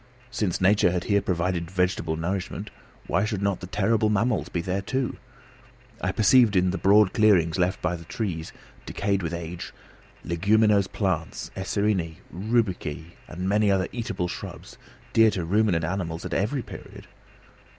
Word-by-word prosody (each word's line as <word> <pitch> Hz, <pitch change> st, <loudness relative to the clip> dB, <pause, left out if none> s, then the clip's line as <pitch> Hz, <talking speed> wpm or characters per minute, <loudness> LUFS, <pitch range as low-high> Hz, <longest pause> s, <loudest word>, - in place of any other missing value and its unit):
Since 105 Hz, -8 st, -1 dB
nature 95 Hz, 0 st, +4 dB
had 90 Hz, 0 st, -1 dB
here 100 Hz, -1 st, +2 dB
provided 85 Hz, -2 st, -1 dB
vegetable 90 Hz, -3 st, 0 dB
nourishment, 90 Hz, +4 st, -4 dB, 0.3 s
why 90 Hz, +3 st, +1 dB
should 105 Hz, -2 st, -2 dB
not 100 Hz, -2 st, 0 dB
the 95 Hz, -, -8 dB
terrible 105 Hz, +3 st, +1 dB
mammals 105 Hz, -, +1 dB
be 85 Hz, -, -2 dB
there 95 Hz, +3 st, -2 dB
too? 130 Hz, +5 st, -2 dB, 0.8 s
I -, -, 0 dB
perceived 110 Hz, -1 st, +5 dB
in 90 Hz, 0 st, +3 dB
the 95 Hz, -, -3 dB
broad 100 Hz, 0 st, +5 dB
clearings 95 Hz, -6 st, +3 dB
left 90 Hz, +2 st, 0 dB
by 80 Hz, -, +1 dB
fallen 85 Hz, -1 st, -6 dB
trees, 85 Hz, -5 st, -4 dB, 0.4 s
decayed 100 Hz, -1 st, -1 dB
with 85 Hz, -2 st, -3 dB
age, 85 Hz, 0 st, -6 dB, 0.5 s
leguminose 100 Hz, +3 st, +3 dB
plants, -, -, -2 dB
acerineæ, 95 Hz, -3 st, -1 dB, 0.2 s
rubiceæ 90 Hz, -6 st, -1 dB, 0.2 s
and 90 Hz, +2 st, -5 dB
many 105 Hz, +1 st, +3 dB
other 95 Hz, -1 st, +2 dB
eatable 110 Hz, -7 st, -3 dB
shrubs, -, -, -8 dB, 0.3 s
dear 115 Hz, -1 st, +6 dB
to 90 Hz, -5 st, -3 dB
ruminant 95 Hz, -3 st, +2 dB
animals 85 Hz, -2 st, -3 dB
at -, -, -4 dB
every 120 Hz, +6 st, 0 dB
period. -, -, -11 dB
95 Hz, 150 wpm, -25 LUFS, 85-105 Hz, 0.8 s, dear